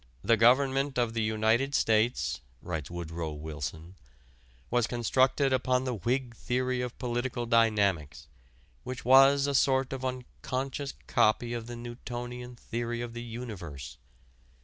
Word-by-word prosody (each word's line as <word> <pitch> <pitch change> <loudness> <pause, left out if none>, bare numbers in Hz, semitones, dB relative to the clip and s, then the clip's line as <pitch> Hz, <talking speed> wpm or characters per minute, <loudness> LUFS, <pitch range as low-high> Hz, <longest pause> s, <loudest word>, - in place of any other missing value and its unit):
"The 115 - +4
Government 135 +4 +3
of 120 -2 +1
the 115 - -1
United 110 +5 +1
States," 110 +1 +1 0.2
writes 80 -5 -4
Woodrow 85 -2 -5
Wilson, 80 +4 -6 0.7
"was 120 -2 +2
constructed 130 +3 +2
upon 130 0 +1
the 130 -1 -2
Whig 120 +4 -1
theory 125 +2 -1
of 125 -1 -5
political 120 -1 -2
dynamics, 100 - +2 0.6
which 130 -2 -6
was 135 +2 +7
a 140 - 0
sort 135 -1 +2
of 130 -1 -5
unconscious 130 +2 -4
copy 115 +2 +2
of 115 -1 -5
the 120 - -6
Newtonian 120 +1 -7
theory 120 0 -4
of 120 -1 -5
the 120 - -6
universe.... 100 - -7
120 Hz, 130 wpm, -29 LUFS, 110-130 Hz, 0.7 s, was